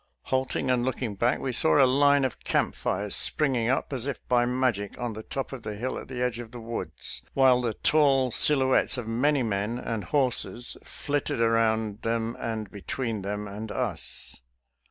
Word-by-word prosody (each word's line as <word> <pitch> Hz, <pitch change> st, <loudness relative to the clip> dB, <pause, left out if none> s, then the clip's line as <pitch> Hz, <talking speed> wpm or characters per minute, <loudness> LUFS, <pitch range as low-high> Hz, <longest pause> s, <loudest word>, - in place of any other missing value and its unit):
Halting 130 Hz, 0 st, 0 dB
and 125 Hz, -1 st, +2 dB
looking 125 Hz, -3 st, -2 dB
back, 120 Hz, +5 st, +1 dB
we 130 Hz, -, -3 dB
saw 80 Hz, -9 st, +3 dB
a -, -, +7 dB
line 140 Hz, +1 st, +4 dB
of 130 Hz, -, -3 dB
camp -, -, 0 dB
fires 100 Hz, +2 st, -1 dB
spring 130 Hz, -6 st, +2 dB
up 135 Hz, +2 st, 0 dB
as 130 Hz, 0 st, -2 dB
if 140 Hz, -, -2 dB
by 120 Hz, -1 st, +3 dB
magic 125 Hz, -6 st, -1 dB
on 120 Hz, -2 st, -3 dB
the 110 Hz, -, -7 dB
top 135 Hz, +4 st, -5 dB
of 130 Hz, -, -6 dB
the 105 Hz, -2 st, -5 dB
hill 125 Hz, +5 st, -3 dB
at -, -, -10 dB
the 125 Hz, -1 st, -3 dB
edge 125 Hz, -1 st, -1 dB
of 120 Hz, -2 st, -7 dB
the 120 Hz, -, -9 dB
woods, 110 Hz, -8 st, -4 dB
while 130 Hz, -2 st, +5 dB
the 115 Hz, -3 st, -2 dB
tall 135 Hz, -4 st, +3 dB
sil 145 Hz, -3 st, +4 dB
houettes 130 Hz, 0 st, +3 dB
of 120 Hz, -3 st, -5 dB
many 130 Hz, +4 st, +2 dB
men 105 Hz, +1 st, -1 dB
and 115 Hz, -5 st, -4 dB
horses 125 Hz, -2 st, 0 dB
flitted 145 Hz, -5 st, -3 dB
around 110 Hz, -2 st, +1 dB
them 115 Hz, +1 st, -1 dB
and 110 Hz, -3 st, -4 dB
between 110 Hz, +2 st, -4 dB
them 105 Hz, +1 st, -4 dB
and 105 Hz, +2 st, -6 dB
us. -, -, -1 dB
120 Hz, 190 wpm, -27 LUFS, 110-130 Hz, -, a